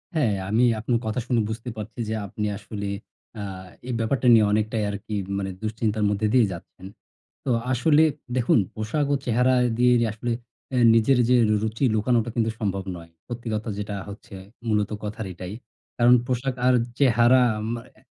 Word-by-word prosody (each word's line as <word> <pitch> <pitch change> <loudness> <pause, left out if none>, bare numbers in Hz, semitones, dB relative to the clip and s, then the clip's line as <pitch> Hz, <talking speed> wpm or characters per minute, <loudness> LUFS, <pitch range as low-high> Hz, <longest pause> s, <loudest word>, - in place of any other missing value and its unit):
হ্যাঁ, 115 -10 +2
আমি 115 +4 +3 0.2
আপনি 120 +2 -2
কথা 110 +3 -1
শুনে 120 -3 +2
বুঝতে 115 +2 -5
পারছি 110 +3 -7
যে, - - -1
আপনি 105 +3 -4
আসলে 100 0 -6 0.5
আ - - -4 0.5
এই 125 - -2
ব্যাপারটা 125 +2 0
নিয়ে 110 -2 +6
অনেকটাই 110 +1 0
আরকি 105 +1 -5 0.2
মানে 95 -1 -2
দুশ্চিন্তার 110 -1 -1
মধ্যে 105 +1 0
দিয়েই 125 -4 +5
যাচ্ছেন। 90 +2 -12 0.6
তো - - -1 0.2
আসলে 145 +5 +4 0.3
দেখুন 120 -1 +3 0.2
পোশাক 115 +7 -1
ও - - +4
চেহারা 125 +2 +3 0.2
দিয়ে 125 0 +5 0.2
আসলে 115 +2 -3 0.4
অ্যা 130 - -1 0.2
নিজের 120 +3 +4
যে 125 - +5
র - - +1
রুচি 110 +4 -1
লুকানোটা 115 +1 +1
কিন্তু 115 -1 +1
সম্ভব 100 -2 -1
নয়। 85 -1 -12 0.2
সত্যি 120 -1 -6
কথা 105 +2 -3
যেটা 105 0 -4
হচ্ছে 100 0 -10 0.3
মূলত 105 -1 +1
কথার 105 0 -5
এটাই। 90 +2 -7 0.5
কারণ 120 +1 +6
পোশাক 130 +1 -1
আর 130 - +5 0.2
চেহারা 125 -1 +5 0.3
মা 120 - -3 0.2
এ - - -21
110 Hz, 170 wpm, -24 LUFS, 105-125 Hz, 0.6 s, নিয়ে